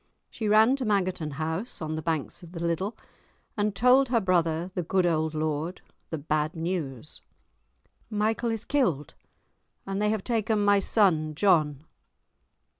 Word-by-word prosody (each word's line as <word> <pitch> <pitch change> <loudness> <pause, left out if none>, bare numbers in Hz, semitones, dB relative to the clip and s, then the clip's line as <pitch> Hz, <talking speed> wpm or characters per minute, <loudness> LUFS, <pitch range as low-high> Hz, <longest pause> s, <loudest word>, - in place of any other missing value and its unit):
She 220 - -4
ran 220 +5 +5
to 265 - -3
Mangerton 185 -7 0
House, 160 - -3
on 155 -1 -4
the 155 - -3
banks 160 -3 -3
of 170 -1 -13
the 170 - -6
Liddel, 170 +6 -2 0.6
and 210 -1 0
told 250 +4 +4
her 240 -2 +3
brother, 175 -2 0
the 180 - -1
good 180 +2 +1
old 160 -2 0
lord, 155 +3 -2 0.3
the 160 - -3
bad 155 +2 -1
news. 160 -5 -4 0.9
"Michael 220 +2 0
is 225 -1 -3
killed, 180 - 0 0.7
and 195 +1 -3
they 210 - +2
have 215 -2 -1
taken 220 -3 0
my 205 0 +5
son 165 -8 +2
John." 155 -6 +2
180 Hz, 150 wpm, -27 LUFS, 155-210 Hz, 0.9 s, ran